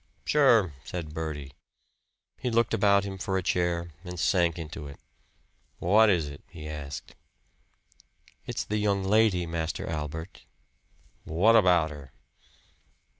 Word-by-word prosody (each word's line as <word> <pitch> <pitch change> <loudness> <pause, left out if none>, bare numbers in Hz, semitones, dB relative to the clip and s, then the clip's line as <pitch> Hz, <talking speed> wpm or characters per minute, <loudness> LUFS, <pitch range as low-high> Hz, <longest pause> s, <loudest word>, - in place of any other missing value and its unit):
"Sure," 115 - +4
said 80 -4 -6
Bertie. 75 -4 -5 0.9
He 125 - -2
looked 115 -1 +1
about 100 -2 +4
him 95 -1 -6
for 95 +1 -1
a 95 - -2
chair 85 -1 0
and 90 -2 -7
sank 85 -2 +2
into 80 -2 -7
it. 70 - -11 0.8
"What 105 +5 +5
is 85 -6 +2
it?" 70 0 -9
he 75 -1 -9
asked. 75 -3 -7 1.3
"It's - - -2
the 105 - -2
young 100 -2 +1
lady, 100 -3 +3
Master 80 -1 -3
Albert." 80 +2 -5 0.8
"What 95 +9 +3
about 90 -7 +4
her?" 70 -3 -11
85 Hz, 125 wpm, -28 LUFS, 80-100 Hz, 1.3 s, What